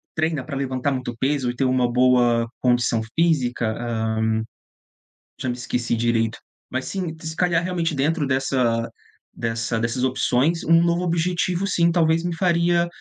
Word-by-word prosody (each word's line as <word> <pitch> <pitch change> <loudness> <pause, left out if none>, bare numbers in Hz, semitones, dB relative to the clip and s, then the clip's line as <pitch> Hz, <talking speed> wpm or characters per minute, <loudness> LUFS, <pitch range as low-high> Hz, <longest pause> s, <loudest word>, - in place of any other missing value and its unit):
treina 160 -4 -1
pra 140 - -6
levantar 135 0 -1
muito 130 -2 -4
peso 135 -2 0
e 120 - -11
ter 135 - +1
uma 125 -1 +2
boa 120 -2 +3
condição 120 -2 +2 0.2
física? 125 -9 +1
"Hã, 110 -1 -1 1.1
já 130 - -2
me 120 - -1
esqueci 125 -1 -2
direito". 115 -1 0 0.3
Mas, 130 0 -2
sim, 175 -5 -4
se 160 0 -6
calhar, 175 -1 +1
realmente, 170 -3 -1
dentro 150 +2 0
dessa 130 -4 0 0.4
dessa 115 0 -2
dessas 120 +3 -1
opções, 130 +5 +1
um 165 +1 +5
novo 170 0 +1
objetivo, 175 +2 0
sim, 170 -3 +2
talvez 165 -1 +2
me 175 -1 -2
faria, 170 -1 +2
130 Hz, 150 wpm, -22 LUFS, 120-165 Hz, 1.1 s, um